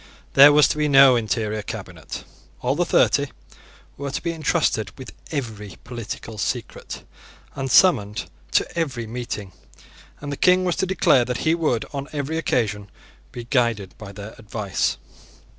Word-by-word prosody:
There 140 +2 +9
was 150 0 +6
to 150 - -2
be 150 - +2
no 135 -2 +7
interior 110 -2 -1
cabinet. - - -7 0.4
All - - +1
the - - 0
thirty - - +3 0.7
were 140 0 -4
to 135 - -4
be 170 - -1
entrusted 145 -8 0
with 130 - -9 0.2
every 110 - -5
political 115 -2 -7
secret, - - -4 0.5
and 135 -1 -4
summoned 105 - +4 0.3
to - - +4
every 135 -9 -2
meeting; 110 -4 -5 0.7
and 145 0 -6
the 140 - -4
King 185 0 +4
was 175 -2 +1
to 190 - 0
declare 165 -8 +4
that 125 0 -3
he 160 - +4
would, 155 -9 0
on 140 0 -4
every 150 +2 -2
occasion, 105 -9 -1 0.4
be 120 - -7
guided 115 -6 0
by 100 -2 -9
their 100 +2 -9
advice. 105 -3 -2
125 Hz, 155 wpm, -23 LUFS, 110-145 Hz, 0.7 s, There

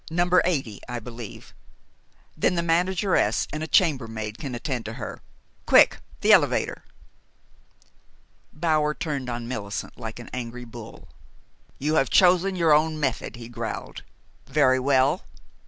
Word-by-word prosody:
80, 175 - +1
I 125 - -3
believe, 115 -1 -9 0.8
then - - +1
the 170 - 0
manageress 175 - +1
and 155 - -3
a 160 - -3
chambermaid 115 - +1
can 135 -5 -5
attend 125 -1 -3
to 110 - -5
her. 120 - -7 0.5
Quick! - - +6 0.2
the - - +4
elevator!" - - +2 1.7
Bower 155 -2 +1
turned 140 -5 -3
on 120 -1 -4
Millicent 105 -3 -5
like 110 -1 -6
an 120 - -10
angry 125 0 -5
bull. 115 -1 -11 0.7
"You 150 +3 -1
have 135 - -2
chosen 185 +1 +4
your 165 -4 +4
own 155 +1 +2
method," 135 -6 -2
he 120 -1 -9
growled. 120 -1 -6 0.5
"Very 135 -2 +3
well. 140 +5 +2
135 Hz, 130 wpm, -25 LUFS, 120-160 Hz, 1.7 s, Quick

